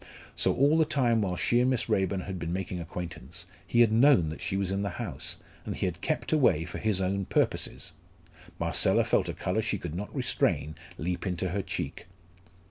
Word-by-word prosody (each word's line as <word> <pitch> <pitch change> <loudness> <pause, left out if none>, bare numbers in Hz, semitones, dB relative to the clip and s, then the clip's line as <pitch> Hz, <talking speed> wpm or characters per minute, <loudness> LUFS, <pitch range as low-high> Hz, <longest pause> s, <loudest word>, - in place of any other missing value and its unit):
So - - +3
all 145 +4 +4
the - - +6
time 125 -7 +2
while 95 -3 -1
she 120 +7 +2
and 125 +1 +3
Miss 130 -4 0
Raeburn 95 0 +1
had 95 -1 -5
been 85 0 -3
making 90 0 -3
acquaintance, 85 -1 -7 0.2
he 120 - +4
had 115 -2 +5
known 115 - +5
that 80 - -7
she 95 - -2
was 95 -1 -1
in 100 0 0
the 100 - -1
house, 85 - -4 0.3
and - - -4
he - - -1
had 90 -1 -3
kept 155 - -1
away 95 - +3
for - - -6
his 110 -4 +1
own 95 +1 0
purposes! - - -1 0.7
Marcella - - +4
felt - - +1
a - - -2
colour 90 +5 -1
she 110 -1 -1
could 85 -4 -6
not 100 +4 -5
restrain 75 - 0 0.2
leap 90 +4 -3
into 90 0 -1
her 100 +3 -1
cheek. - - -5
95 Hz, 205 wpm, -29 LUFS, 90-115 Hz, 0.7 s, the